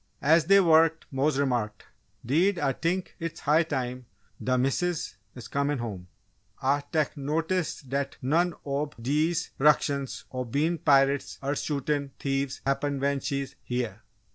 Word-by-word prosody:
As 160 +2 +5
they 195 +3 +7
worked, 165 -2 +4
Mose 135 +2 +1
remarked: 120 -7 -1 0.4
"'Deed 175 - +3
Ah 145 -4 +1
t'ink 175 +6 -2
it's 165 -2 -5
high 155 +2 +4
time 125 -6 -3 0.4
d' 130 0 +2
Missus 150 +3 0 0.2
is 125 - -9
comin' 140 +1 0
home. 100 -7 -5 0.5
Ah 140 +2 +2
tek 155 -1 0
notice 160 +4 -1
dat 135 +1 -3
none 165 +6 +1
ob 145 +1 -2
dese 150 +7 0
'ructions 140 -2 +2
ob 125 -2 -4
bein' 160 +5 +1
pirates 140 -1 +3
er 140 +2 0
shootin' 140 -1 -2
thieves 135 -1 -2
happen 140 +1 0
when 140 0 +1
she's 140 0 -3
heah!" 120 -4 -3
140 Hz, 140 wpm, -27 LUFS, 135-160 Hz, 0.5 s, they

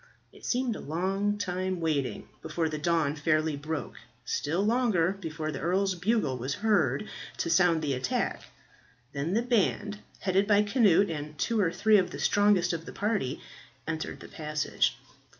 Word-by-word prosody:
It - - -17
seemed 250 -2 0
a - - -6
long 195 +6 -1
time 185 -2 -2
waiting 155 -5 -1
before 160 +1 -1
the 155 -1 -4
dawn 160 -2 +1
fairly 155 0 +1
broke 150 0 -5 0.3
still 170 +11 0
longer 215 -7 +2
before 155 -3 -4
the 140 - -5
earl's 190 +2 +1
bugle 180 - 0
was 130 +4 -2
heard 180 - +2 0.3
to 170 - -1
sound 165 -1 +4
the 145 -2 0
attack. 130 0 -1 0.7
Then 150 +6 -1
the 230 - +2
band, 210 -3 0 0.2
headed 195 +1 +2
by 210 -1 +5
Cnut 205 -4 +4
and 150 -1 -6
two 225 - 0
or 180 -5 +2
three 215 +2 +4
of 180 - 0
the - - -7
strongest 205 -4 +3
of 165 0 -4
the - - -6
party, 205 - -1 0.5
entered 155 0 -4
the - - -9
passage. 150 -1 -1
175 Hz, 165 wpm, -29 LUFS, 155-205 Hz, 0.7 s, by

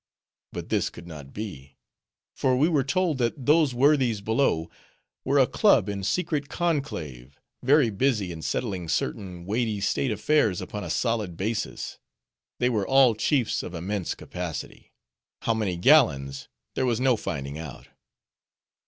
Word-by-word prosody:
But - - -7
this - - +1
could 85 - -12
not 75 -5 -10
be; 70 -11 -8 0.6
for 130 -1 +2
we 145 +5 +4
were 150 -6 +2
told 165 0 0
that 120 +2 -1
those 150 -3 +4
worthies 130 -4 +3
below, 105 -6 +1 0.6
were 140 +2 +1
a 135 - +6
club 125 - +3
in 100 -1 -3
secret 150 - -1
conclave; 85 - -3 0.2
very 135 -2 +4
busy 105 -4 0
in 80 -1 -7
settling 90 - -3
certain 90 +6 -3
weighty 110 +1 -1
state 105 +6 0
affairs 110 -2 +2
upon 105 -1 -6
a - - -6
solid 110 -8 -1
basis, 105 +2 -3 0.6
They 125 - +2
were 110 -6 0
all 135 -3 +5
chiefs 125 +2 +1
of 90 - -7
immense 95 +2 -3
capacity:—how 85 - -6
many 105 -6 -1
gallons, 70 -5 +3 0.3
there 130 - 0
was 120 -2 +1
no 130 -1 +3
finding 70 -7 -5
out. 80 -4 -9
110 Hz, 145 wpm, -26 LUFS, 85-135 Hz, 0.6 s, a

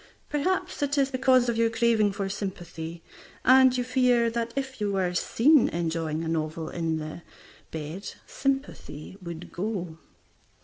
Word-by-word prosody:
Perhaps, 365 +5 -1
it 285 0 0
is 275 -1 +2
because 255 -1 +4
of 235 -1 0
your 230 0 +3
craving 225 -2 +3
for 195 0 -3
sympathy, 175 -4 -6 0.4
and 260 0 +6
you 250 - +1
fear 250 -2 +3
that 235 0 -2
if 265 -3 -4
you 205 -1 +1
were 185 -2 0
seen 260 - +4
enjoying 165 -1 -2
a - - -3
novel 160 0 -2
the 160 0 -6 0.2
sympathy 270 - -3
would 170 -1 -8
go. 180 -4 -3
210 Hz, 135 wpm, -27 LUFS, 165-255 Hz, 0.4 s, and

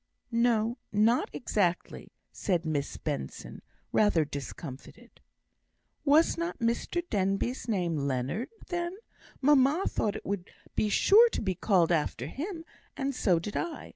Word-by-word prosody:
"No 235 0 +2
not 220 +4 +3
exactly," 190 -7 -1 0.2
said 175 -4 -1
Miss 145 -3 -2
Benson, 65 -1 -5 0.3
rather 190 -7 +3
discomfited. 145 - -9 0.8
"Was 310 +3 +4
not 340 +1 -2
Mr 235 +9 -1
Denbigh's 195 - -1
name 180 -7 0
Leonard, 135 - -2 0.2
then? 350 +1 -2 0.4
Mamma 290 +4 +4
thought 210 -2 -1
it - - -7
would 195 -2 -3 0.3
be 215 - +1
sure 445 - +6
to - - -3
be 190 -2 0
called 180 -2 +2
after 150 -6 0
him, 325 - -5 0.3
and 275 0 -1
so 190 -8 +2
did 185 +5 -5
I. 340 -3 -4
215 Hz, 130 wpm, -29 LUFS, 175-275 Hz, 0.8 s, sure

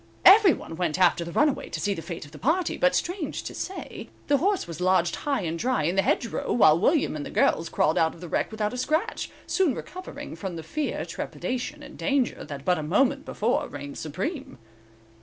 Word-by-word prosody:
Every 395 -1 +9
one 165 - -8
went 175 -3 0
after 175 -2 +4
the 170 - -7
runaway 290 - +1
to 165 - -4
see 200 +6 0
the 165 - -6
fate 170 -1 -7
of 145 - -15
the 150 - -11
party; 330 +6 +1
but 270 0 +2
strange 350 -2 -2
to - - -6
say, 380 - -6 0.2
the 285 - +5
horse 390 +6 +1
was 170 -1 -8
lodged 180 -2 +3
high 280 -5 -1
and 165 -2 -3
dry 250 -5 +1
in 170 +5 0
the 195 - +4
hedge 235 - +1
row, - - -3
while 165 -9 +5
William 280 - +2
and 150 - -4
the - - -6
girls 165 - +2
crawled 155 - +2
out 160 0 +2
of - - -15
the 175 - -8
wreck - - 0
without 215 0 -2
a - - -4
scratch, 315 - -1 0.2
soon 355 -10 +1
recovering 295 - -8
from 175 +2 -5
the 165 - -6
fear, 295 - -3
trepidation 260 +4 -4
and - - -12
danger 275 -3 0
that 140 -1 -8
but 180 -2 +2
a - - -2
moment 270 - +1
before 230 +4 0
reigned 145 0 -7
supreme. 190 - -4
210 Hz, 220 wpm, -26 LUFS, -, 0.2 s, Every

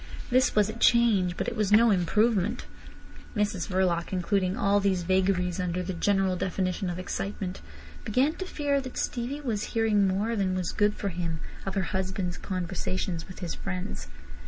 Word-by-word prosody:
This 255 +1 +3
was 210 -2 +4
a 220 - -4
change, 210 -7 +3
but - - -2
it 235 - -2
was 210 -3 0
no 225 +2 +6
improvement. 210 +4 +2 0.7
Mrs 205 -4 0
Verloc 180 -3 0
including 190 +1 0
all 205 -3 +3
these 190 -3 +1
vagaries 185 0 +1
under 180 0 -1
the 185 +1 -3
general 195 +1 +2
definition 185 +1 -1
of 175 - -4
excitement, 190 0 -4 0.4
began 255 +8 +2
to 375 - -4
fear 285 -4 0
that 255 -2 -8
Stevie 255 +5 -2
was 225 -7 -3
hearing 210 -3 +3
more 205 +5 0
than 190 -3 0
was 180 -2 -1
good 210 0 +2
for 200 - -2
him 170 -2 -3 0.3
of 195 - -2
her 195 - +1
husband's 190 -1 -2
conversations 185 -2 -3
with 185 - -11
his 175 -2 -3
friends. 190 0 -5
195 Hz, 170 wpm, -28 LUFS, 180-215 Hz, 0.7 s, no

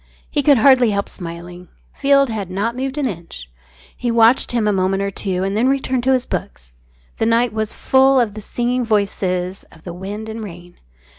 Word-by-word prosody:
He 290 - +1
could 285 -1 +5
hardly 255 0 +5
help 200 -1 -1
smiling. 175 0 -9 0.3
Field 275 -1 +3
had 205 -4 -4
not 205 +6 -2
moved 265 +2 -4
an 285 -3 0
inch. 165 - -8 0.4
He 245 - -3
watched 230 +2 +4
him 235 -3 0
a 210 - +2
moment 195 +1 0
or 200 - -2
two 185 -1 -2
and 195 +1 -1
then 240 +5 +2
returned 265 -2 0
to 265 - +4
his 255 -1 0
books. - - -6 0.5
The 225 - +1
night 230 0 +2
was 220 -1 -3
full 265 0 +4
of 230 -4 0
the 215 - -8
singing 245 +3 -1
voices 195 -4 -1
of 160 - -18
the 175 - -7
wind 200 +5 -6
and 220 0 -6
rain. 175 -3 -11
215 Hz, 200 wpm, -19 LUFS, 185-250 Hz, 0.5 s, could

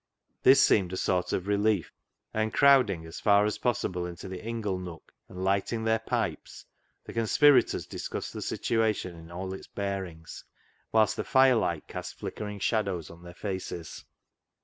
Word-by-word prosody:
This 130 +1 +7
seemed 95 -9 +4
a - - -2
sort 90 -2 0
of 90 - -1
relief, 100 -3 +1 0.4
and 110 0 0
crowd 135 -3 +6
ing 85 -4 -4
as 80 +1 -8
far 100 0 +4
as 105 - -2
possible 90 -7 -1
into 85 +1 -8
the 95 +1 -7
ingle 110 -4 -3
nook 90 -3 -10 0.2
and 95 -1 -6
lighting 100 +4 0
their 110 0 +2
pipes, 110 - -3 0.4
the - - -10
conspirators 130 +5 +4
discussed - - -5
the - - -6
situation 110 -6 -1
in 80 0 -12
all 95 +2 -5
its 95 - -9
bearings, 95 -5 -5 0.5
whilst 110 -1 +3
the - - -1
fire 130 0 +5
light 85 -9 -1
cast - - -7
flickering 105 -1 -6
shadows 100 -6 -1
on 85 0 -14
their 85 0 -11
faces. 95 -4 -5
100 Hz, 165 wpm, -28 LUFS, 90-110 Hz, 0.5 s, This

